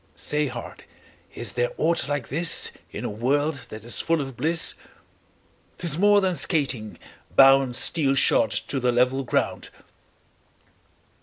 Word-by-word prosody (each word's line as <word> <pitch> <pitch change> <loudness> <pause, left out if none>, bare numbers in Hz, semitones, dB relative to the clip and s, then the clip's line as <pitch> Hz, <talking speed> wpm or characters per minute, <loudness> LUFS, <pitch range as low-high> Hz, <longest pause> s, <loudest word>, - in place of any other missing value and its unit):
Say, 150 0 -1
heart, - - -9 0.5
is - - -2
there - - -1
aught 170 -2 0
like 145 -3 -3
this 165 +5 0 0.2
In - - -6
a - - -1
world 140 +6 -1
that 110 0 -9
is 120 - -3
full 165 0 0
of 135 -3 -5
bliss? 160 +7 +1 1.0
'Tis 170 -4 +1
more 205 +1 +5
than 190 -1 +1
skating, 135 - -1 0.4
bound 135 -2 +6
15 - - 0
Steel 140 -4 +1
shod 115 -4 +3
to 135 +7 -2
the 125 -1 +1
level 125 +2 +1
ground. 125 - -2
140 Hz, 145 wpm, -24 LUFS, 125-165 Hz, 1.0 s, bound